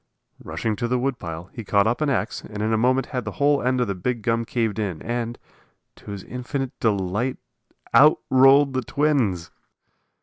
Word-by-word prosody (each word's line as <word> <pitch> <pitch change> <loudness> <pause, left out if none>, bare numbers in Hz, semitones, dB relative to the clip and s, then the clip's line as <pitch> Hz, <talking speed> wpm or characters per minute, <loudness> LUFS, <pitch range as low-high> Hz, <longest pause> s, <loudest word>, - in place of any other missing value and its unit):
Rushing 110 -2 -2
to 120 - -1
the 125 +1 +1
wood 130 0 -1
pile, 85 0 -7
he 115 - -7
caught 100 -1 +2
up 120 +6 0
an 150 - +1
ax 115 -5 -1
and 105 -1 -6
in 110 +1 +1
a - - +4
moment 125 +3 +2
had 125 -2 -1
the 110 -1 -5
whole 145 0 +2
end 130 +1 +1
of 125 - +2
the 100 - -2
big 110 +5 -3
gum 115 +1 0
caved 115 -3 -1
in, 95 -7 -2
and, 120 0 -3 0.6
to - - -13
his 100 -2 -6
infinite 130 +1 -4
delight, 105 +3 0 0.6
out 150 +2 +7
rolled 135 +1 +6
the 130 - 0
twins! 125 - 0
120 Hz, 195 wpm, -23 LUFS, 105-130 Hz, 0.6 s, out